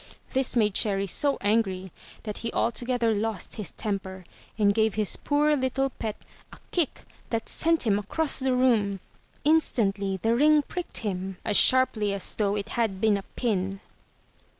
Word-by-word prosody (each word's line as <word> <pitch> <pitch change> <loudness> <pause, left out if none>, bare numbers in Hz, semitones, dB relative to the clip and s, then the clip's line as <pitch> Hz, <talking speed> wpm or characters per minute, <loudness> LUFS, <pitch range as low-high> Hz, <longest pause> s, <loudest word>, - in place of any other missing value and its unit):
This 265 -1 +2
made 210 -4 +3
Cherry 195 -1 +1
so 280 - +3
angry 195 -3 0 0.3
that 210 -2 -5
he 230 - -4
altogether 240 0 0
lost 215 -2 -3
his 210 -5 -4
temper 190 -3 -5 0.3
and 205 -2 +3
gave 220 0 +1
his 215 -2 0
poor 295 +1 +2
little 270 0 0
pet 220 -3 -4 0.4
a - - -12
kick 340 -6 -1 0.3
that 225 -1 -2
sent 330 0 +1
him 205 -2 +2
across 285 +10 -2
the 260 -1 +1
room. 220 -6 +2 0.4
Instantly 205 -11 +1
the 225 +5 +1
ring 300 +3 +5
pricked 355 +4 -5
him 190 -1 -3
as 210 - 0
sharply 225 -6 +4
as 200 - -3
though 205 -1 0
it 205 +1 -4
had 220 -5 -1
been 215 0 +3
a 200 - -2
pin. 195 -5 -1
220 Hz, 160 wpm, -26 LUFS, 200-255 Hz, 0.4 s, ring